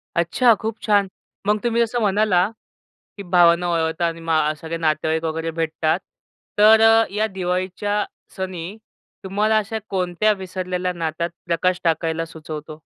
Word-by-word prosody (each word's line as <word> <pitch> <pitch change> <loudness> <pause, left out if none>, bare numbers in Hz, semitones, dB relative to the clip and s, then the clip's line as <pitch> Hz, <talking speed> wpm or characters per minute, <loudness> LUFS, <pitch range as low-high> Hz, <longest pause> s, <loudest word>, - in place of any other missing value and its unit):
अच्छा, 185 +8 +4
खूप 220 0 -3
छान. 205 -2 +3 0.4
मग 210 0 +2
तुम्ही 235 -1 +1
जसं 235 +1 0
म्हणाला 205 -2 +2 0.7
की 200 - -6
भावांना 175 -1 +4
ओवाळता 165 +1 0
आणि 165 0 -4
मग 155 -2 +1
सगळे 165 +1 -4
नातेवाईक 160 0 0
वगैरे 165 +1 -2
भेटतात, 160 0 -1 0.6
तर 220 +1 +7 0.3
या 210 +2 0
दिवाळीच्या 190 +2 -2 0.3
सणी 185 0 -5 0.5
तुम्हाला 210 +3 +1
अशा 220 +1 -3
कोणत्या 185 +3 +1
विसरलेल्या 185 -1 -3
नात्यात 170 0 -3 0.2
प्रकाश 175 +2 0
टाकायला 165 0 0
सुचवतो? 155 -1 -8
180 Hz, 130 wpm, -21 LUFS, 165-205 Hz, 0.7 s, तर